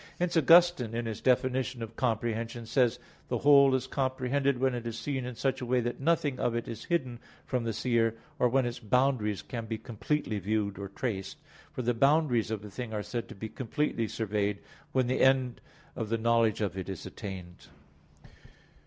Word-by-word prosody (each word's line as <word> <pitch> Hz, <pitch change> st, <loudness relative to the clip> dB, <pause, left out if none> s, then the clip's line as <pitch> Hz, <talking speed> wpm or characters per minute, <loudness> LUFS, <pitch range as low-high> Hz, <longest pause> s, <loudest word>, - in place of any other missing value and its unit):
Hence 175 Hz, 0 st, -1 dB
Augustine, 165 Hz, -6 st, +5 dB
in 120 Hz, 0 st, -2 dB
his 110 Hz, -2 st, -4 dB
definition 130 Hz, -1 st, +1 dB
of 115 Hz, 0 st, -8 dB
comprehension, 115 Hz, 0 st, -1 dB
says 125 Hz, 0 st, +2 dB, 0.3 s
the -, -, -1 dB
whole 140 Hz, -2 st, +6 dB
is 130 Hz, -, -1 dB
comprehended 130 Hz, +1 st, 0 dB
when 130 Hz, +1 st, +1 dB
it 120 Hz, -1 st, -4 dB
is 115 Hz, -1 st, -4 dB
seen 135 Hz, 0 st, -3 dB
in 125 Hz, -1 st, -5 dB
such 135 Hz, +3 st, -1 dB
a -, -, -3 dB
way 125 Hz, +1 st, +3 dB
that 120 Hz, 0 st, -3 dB
nothing 145 Hz, -3 st, +1 dB
of 120 Hz, -, 0 dB
it 120 Hz, -, -2 dB
is 115 Hz, -1 st, -7 dB
hidden 130 Hz, -9 st, -1 dB, 0.3 s
from 125 Hz, -3 st, -1 dB
the 115 Hz, -, 0 dB
seer, 115 Hz, 0 st, +1 dB, 0.2 s
or 125 Hz, -, +4 dB
when 130 Hz, +1 st, +2 dB
its 120 Hz, +1 st, -4 dB
boundaries 110 Hz, -, +1 dB
can 115 Hz, +8 st, -6 dB
be 110 Hz, 0 st, -3 dB
completely 115 Hz, 0 st, -2 dB
viewed 100 Hz, 0 st, -1 dB
or 100 Hz, -, -4 dB
traced; 100 Hz, -2 st, -4 dB, 0.3 s
for 125 Hz, -, -4 dB
the 120 Hz, +1 st, +2 dB
boundaries 135 Hz, -2 st, +3 dB
of 110 Hz, -2 st, -4 dB
a -, -, -8 dB
thing 120 Hz, +2 st, -6 dB
are 105 Hz, -, -2 dB
said 120 Hz, +1 st, -4 dB
to -, -, -9 dB
be 110 Hz, +3 st, -5 dB
completely 120 Hz, 0 st, -2 dB
surveyed 105 Hz, -2 st, -1 dB, 0.3 s
when 130 Hz, -1 st, +2 dB
the 130 Hz, +2 st, 0 dB
end 130 Hz, -2 st, +3 dB, 0.3 s
of 110 Hz, -, -3 dB
the 115 Hz, -, +1 dB
knowledge 115 Hz, -1 st, +2 dB
of 100 Hz, -4 st, -1 dB
it 95 Hz, 0 st, -5 dB
is 95 Hz, -4 st, -6 dB
attained. 90 Hz, -3 st, -8 dB
120 Hz, 195 wpm, -30 LUFS, 110-130 Hz, 0.3 s, whole